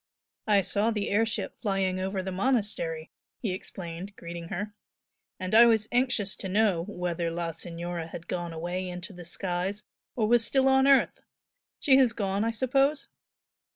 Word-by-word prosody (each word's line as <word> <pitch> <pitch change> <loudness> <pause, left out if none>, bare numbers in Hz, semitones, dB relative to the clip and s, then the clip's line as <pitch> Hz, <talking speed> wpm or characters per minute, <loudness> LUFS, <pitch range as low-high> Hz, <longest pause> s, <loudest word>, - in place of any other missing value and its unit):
"I 205 -2 +4
saw 205 +5 +1
the 210 -3 -2
air 220 +3 +3
ship 225 - -3
flying 195 -3 0
over 190 0 -2
the 190 - -4
monastery," 190 -7 -1 0.3
he 215 - -3
explained, 185 +1 -7
greeting 170 0 -7
her 205 +4 -4 0.7
"And 185 +1 -4
I 235 +2 +9
was 220 -2 +3
anxious 245 -6 +1
to 190 - -5
know 195 -4 +2
whether 175 -4 -2
la 165 0 -3
Signora 170 0 -4
had 165 0 -9
gone 175 -1 -3
away 175 +3 -4
into 180 +3 -7
the 175 -1 -10
skies 185 +3 -2 0.3
or 220 -3 +1
was 240 +1 +4
still 265 +2 +3
on 265 0 +5
earth! 275 -1 +4 0.6
She 265 -2 +5
has 255 -4 +4
gone, 200 -1 -1
I 225 - +1
suppose?" 270 +5 +1
195 Hz, 165 wpm, -28 LUFS, 175-225 Hz, 0.7 s, I